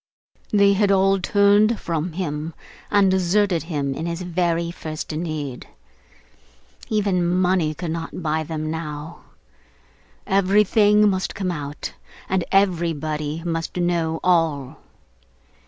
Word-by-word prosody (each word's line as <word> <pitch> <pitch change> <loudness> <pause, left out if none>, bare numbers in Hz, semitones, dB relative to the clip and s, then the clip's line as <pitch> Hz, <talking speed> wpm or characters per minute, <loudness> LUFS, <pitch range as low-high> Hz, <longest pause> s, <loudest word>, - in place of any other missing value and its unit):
They 200 -1 +4
had 200 0 +2
all 195 0 +3
turned 205 +3 +3
from 165 0 -3
him 160 -2 -4 0.3
and 200 -2 +4
deserted 190 -1 +2
him 140 -4 -1
in 160 +5 -4
his 170 +1 -4
very 170 -1 0
first 155 -2 -6
need. 155 -5 -4 1.2
Even 200 -4 +1
money 180 -2 +1
could 175 -1 -4
not 165 +1 -5
buy 160 0 0
them 155 0 -4
now; 160 0 -6 1.1
everything 210 +2 +4
must 190 -2 -1
come 185 -2 -2
out, 145 -3 -6 0.3
and 190 -2 0
everybody 160 -5 0
must 165 0 -3
know 170 -2 0
all. 160 -6 +1
170 Hz, 115 wpm, -22 LUFS, 155-190 Hz, 1.2 s, They